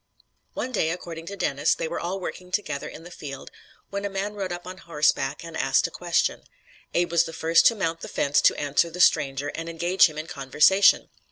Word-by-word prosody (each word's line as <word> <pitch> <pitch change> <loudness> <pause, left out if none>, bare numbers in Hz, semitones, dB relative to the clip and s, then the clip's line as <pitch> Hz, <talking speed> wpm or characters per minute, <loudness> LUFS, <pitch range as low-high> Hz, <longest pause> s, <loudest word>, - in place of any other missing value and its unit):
One 255 - -3
day, 180 -9 +1
according 165 -1 -6
to 200 - -5
Dennis, 145 -6 +1
they - - -3
were 170 - -4
all 185 +3 -3
working 180 0 -7
together 155 -8 -2
in 160 - -10
the 175 - -11
field, 135 -5 -8 0.4
when 200 0 -3
a 200 - -2
man 195 +2 -3
rode 195 -3 -4
up 175 0 -6
on 185 +1 -8
horseback 150 -4 0
and 165 -1 -9
asked 135 -3 +2
a - - -3
question. 175 -1 0 0.5
Abe 175 -1 +1
was 170 0 +3
the 165 - -7
first 165 +1 +4
to 230 - +3
mount 165 -5 -2
the - - -6
fence 145 +1 +1
to - - +4
answer 145 +4 +1
the 175 +2 -9
stranger 145 -4 +3
and 165 +3 -6
engage 175 +3 +4
him 155 -2 -10
in 155 - -4
conversation. 160 +5 +3
165 Hz, 215 wpm, -25 LUFS, 150-185 Hz, 0.5 s, first